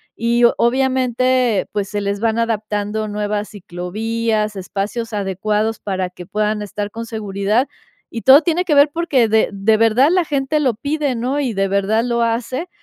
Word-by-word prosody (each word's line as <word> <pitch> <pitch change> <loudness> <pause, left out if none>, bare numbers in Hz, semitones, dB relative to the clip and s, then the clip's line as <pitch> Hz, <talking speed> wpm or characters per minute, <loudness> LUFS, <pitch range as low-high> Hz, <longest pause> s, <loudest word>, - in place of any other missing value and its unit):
y 235 +1 +1
obviamente, 255 -2 +1
pues, 200 -2 -2
se 205 - -2
les 200 0 -2
van 225 +1 0
adaptando 215 -1 -2
nuevas 210 0 -3
ciclovías, 215 +3 -3
espacios 205 +5 -4
adecuados 210 +2 -1
para 185 -2 -3
que 180 -1 -11
puedan 210 +1 -1
estar 205 0 -5
con 230 +2 -6
seguridad, 210 +3 -1 0.4
y 230 - -5
todo 270 +3 +7
tiene 345 +3 +1
que 310 -5 +2
ver 285 +1 +5
porque 305 -8 +2
de 220 0 +2
de 200 +2 +2
verdad 230 +6 +4
la 365 -1 +3
gente 290 +1 0
lo 255 -5 +1
pide, 285 +2 -2
¿no? 255 +5 -1
Y 255 -5 -1
de 195 -1 0
verdad 200 +3 +1
lo 235 -1 0
hace 245 +8 -2
225 Hz, 170 wpm, -19 LUFS, 205-255 Hz, 0.4 s, todo